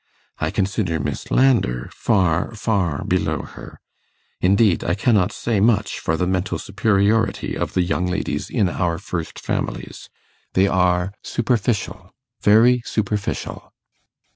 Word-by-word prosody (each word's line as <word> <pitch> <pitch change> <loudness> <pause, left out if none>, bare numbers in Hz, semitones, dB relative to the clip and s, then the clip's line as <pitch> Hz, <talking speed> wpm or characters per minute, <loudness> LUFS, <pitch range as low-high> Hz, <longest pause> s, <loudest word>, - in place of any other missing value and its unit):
I - - 0
consider 95 -4 -1
Miss 70 - -4
Landor 120 - +2
far, 95 0 +1
far 95 -9 -1
below - - 0
her. - - -11 0.6
Indeed, 100 +1 +3
I 85 - 0
cannot 100 -2 +2
say 115 -3 -1
much 105 -1 +2
for 80 - -1
the 90 - 0
mental 90 -1 -1
superiority 100 +3 +1
of - - -3
the 90 - +3
young 90 0 -1
ladies 90 - -2
in 100 - +1
our 85 -1 -1
first 85 -2 -5
families. - - -4 0.4
They 95 - +4
are 90 0 +1
superficial 110 -5 -2 0.3
very 120 +4 +5
superficial. 105 -2 -3
100 Hz, 125 wpm, -21 LUFS, 90-110 Hz, 0.6 s, very